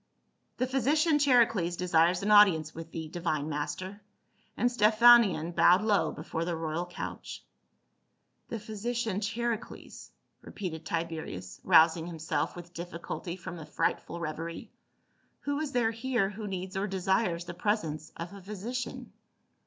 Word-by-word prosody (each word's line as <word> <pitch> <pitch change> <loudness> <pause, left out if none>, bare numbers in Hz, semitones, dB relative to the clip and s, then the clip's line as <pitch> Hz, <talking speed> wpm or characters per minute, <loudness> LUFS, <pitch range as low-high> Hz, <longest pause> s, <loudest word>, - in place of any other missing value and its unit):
" - - -47
The 255 - +1
physician 295 +5 +2
Charicles 230 -11 +3
desires 175 0 +2
an 210 - +1
audience 180 -7 +6
with 165 0 -8
thee, 160 -1 -5
divine 155 -3 -2
master." 155 +7 -4 0.6
And 245 - +2
Stephanion 215 -6 +5
bowed 180 +4 +5
low 200 -7 +2
before 160 +2 -4
the 170 0 -2
royal 165 +2 -3
couch. 175 - -7 0.5
'* - - -47
The 230 - -4
physician 220 -1 -3
Charicles," 225 +2 -4 0.3
repeated 165 -5 -6
Tiberius, 160 - -4
rous 160 0 +6
ing 165 0 -5
himself 160 -2 -2
with 175 0 -10
difficulty 170 0 -6
from 180 -1 -8
a 155 - -8
frightful 170 +2 -2
reverie. 165 +1 -5 0.3
" - - -42
Who 285 0 -2
is 305 -2 -3
there 240 -3 +2
here 230 -3 0
who 210 +1 -6
needs 190 0 -5
or 195 +2 -1
desires 190 -2 0
the 175 - -6
pres 205 +5 0
ence 155 -1 -6
of 170 +3 -6
a 200 - -10
physician 215 +6 -6
185 Hz, 150 wpm, -29 LUFS, 165-220 Hz, 0.6 s, audience